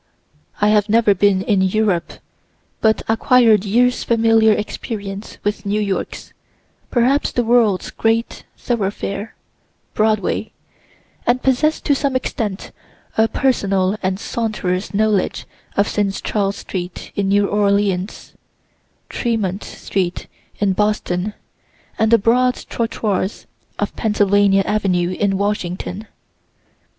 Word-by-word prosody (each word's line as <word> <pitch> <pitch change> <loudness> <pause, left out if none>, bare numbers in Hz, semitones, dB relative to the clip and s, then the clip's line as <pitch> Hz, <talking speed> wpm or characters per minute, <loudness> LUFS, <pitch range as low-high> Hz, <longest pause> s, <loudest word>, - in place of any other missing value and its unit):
I 210 - +3
have 210 0 +3
never 220 -1 +4
been 195 0 +2
in 200 -2 +2
Europe, 190 -2 +1 0.7
but 220 0 +2
acquired 225 -2 +4
years' 245 +5 +2
familiar 225 -1 +4
experience 205 -1 -4
with 205 0 -2
New 205 +1 0
York's, 200 -2 -3 0.6
(perhaps 260 +4 +2
the 245 - 0
world's) 225 -5 +2
great 225 +1 -1
thoroughfare, 205 -1 -3 0.6
Broadway, 215 0 0 0.7
and 245 +1 +2
possess 285 +4 +2
to 285 - +2
some 275 -1 -1
extent 215 -6 -3 0.4
a 220 0 +4
personal 200 -6 +1
and 185 0 -1
saunterer's 210 -5 -2
knowledge 210 -1 0 0.3
of 200 +1 +3
St. 200 -2 -1
Charles 200 -2 0
street 180 -1 -6
in 200 -1 0
New 200 +1 +3
Orleans, 200 -1 0 0.7
Tremont 215 -5 -2
street 180 -3 -3 0.3
in 200 -2 +1
Boston, 210 -1 -1 0.6
and 220 - +3
the 230 - +6
broad 250 +4 +2
trottoirs 215 -4 -2 0.3
of - - -3
Pennsylvania 205 -2 +3
avenue 185 -4 0
in 195 +1 0
Washington. 200 0 -3
210 Hz, 110 wpm, -19 LUFS, 195-225 Hz, 0.7 s, the